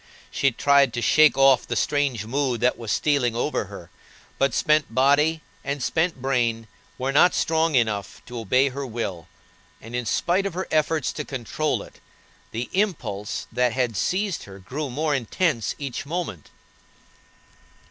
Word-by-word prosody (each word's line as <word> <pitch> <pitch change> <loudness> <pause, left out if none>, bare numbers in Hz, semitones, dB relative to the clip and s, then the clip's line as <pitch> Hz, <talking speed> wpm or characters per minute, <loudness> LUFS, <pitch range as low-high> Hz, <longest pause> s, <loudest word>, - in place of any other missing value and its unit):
She 140 - +2
tried 140 0 +3
to 120 - -2
shake 155 -1 +5
off 135 -2 +5
the 120 - -2
strange 135 -3 0
mood 130 0 -1
that 125 +1 +3
was 115 -3 -5
stealing 130 -3 +1
over 120 - -1
her, - - -11 0.5
but 135 -3 +2
spent 150 -4 +2
body 145 +4 +3 0.2
and 140 -1 -3
spent 165 -3 0
brain 120 -4 0 0.3
were 130 +2 -1
not 165 +6 +5
strong 160 -1 +1
enough 110 -5 0
to 120 0 -7
obey 130 +5 +2
her 140 +2 -5
will, 110 - -5 0.5
and, 115 +2 -9
in 120 -2 -2
spite 190 +3 +1
of 185 - -7
her 185 - -3
efforts 155 -1 +1
to 150 - -4
control 140 +3 -2
it, - - -16 0.5
the 120 +2 -4
impulse 165 - -2
that 125 0 +1
had 125 -3 0
seized 190 - -1
her 95 -1 -11
grew 135 +10 -5
more 150 +4 -1
intense 130 - 0
each 140 -1 -5
moment. 160 - -4
135 Hz, 155 wpm, -24 LUFS, 120-155 Hz, 0.5 s, shake